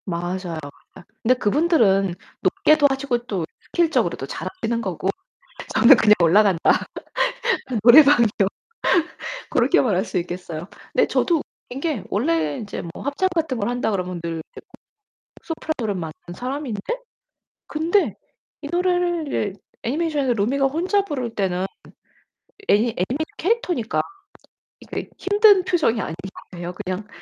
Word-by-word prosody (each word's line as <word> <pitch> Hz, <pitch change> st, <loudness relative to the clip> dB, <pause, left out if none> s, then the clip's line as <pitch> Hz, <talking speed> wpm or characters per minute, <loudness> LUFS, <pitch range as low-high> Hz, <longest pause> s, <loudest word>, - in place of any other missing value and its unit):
맞아요. 175 Hz, -1 st, -3 dB
아 145 Hz, -, -6 dB, 0.5 s
근데 250 Hz, +3 st, +4 dB
그분들은 210 Hz, -, +2 dB, 0.3 s
높게도 305 Hz, -1 st, +4 dB
하시고 270 Hz, -2 st, -1 dB
또 195 Hz, -8 st, -2 dB, 0.2 s
스킬적으로도 340 Hz, -2 st, 0 dB
잘하시는 235 Hz, -11 st, -3 dB
거고 190 Hz, -3 st, -3 dB, 0.7 s
저는 265 Hz, +3 st, +8 dB
그냥 210 Hz, -1 st, +6 dB
올라간다. 185 Hz, +1 st, +4 dB, 1.0 s
노래방이요. 260 Hz, 0 st, +8 dB, 1.2 s
고렇게 255 Hz, -1 st, +3 dB
말할 200 Hz, -5 st, +1 dB
수 190 Hz, -, -3 dB
있겠어요. 175 Hz, -1 st, -5 dB, 0.3 s
근데 -, -, +3 dB
저도 335 Hz, -4 st, +1 dB, 0.3 s
웃긴 255 Hz, -, -6 dB
게 300 Hz, -, -1 dB
원래 165 Hz, -7 st, 0 dB
인제 210 Hz, -2 st, -5 dB
뭐 -, -, -8 dB
합창 285 Hz, +7 st, 0 dB
같은 310 Hz, -6 st, 0 dB
걸 205 Hz, 0 st, -1 dB
한다 245 Hz, -2 st, -1 dB
그러면 180 Hz, -3 st, -3 dB
늘 165 Hz, -1 st, -3 dB
이제 -, -, -10 dB, 0.8 s
소프라노를 310 Hz, -, -3 dB
맡는 165 Hz, +1 st, -8 dB
사람인데 255 Hz, -3 st, -4 dB, 0.9 s
근데 330 Hz, +6 st, +1 dB, 0.5 s
이 290 Hz, -, -6 dB
노래를 350 Hz, -, 0 dB, 0.3 s
애니메이션에서 290 Hz, -1 st, 0 dB
루미가 255 Hz, +6 st, +1 dB
혼자 360 Hz, +8 st, +1 dB
부를 255 Hz, -, -4 dB
때는 190 Hz, -2 st, 0 dB, 1.0 s
애니 205 Hz, -, +5 dB
애니메이션 240 Hz, -, -2 dB
캐릭터니까 355 Hz, -, 0 dB, 0.8 s
이게 -, -, -6 dB
힘든 410 Hz, -1 st, +5 dB
표정이 310 Hz, -, +1 dB
아니에요. 180 Hz, 0 st, -7 dB
그냥 195 Hz, +1 st, -5 dB
235 Hz, 300 characters per minute, -22 LUFS, 190-310 Hz, 1.2 s, 저는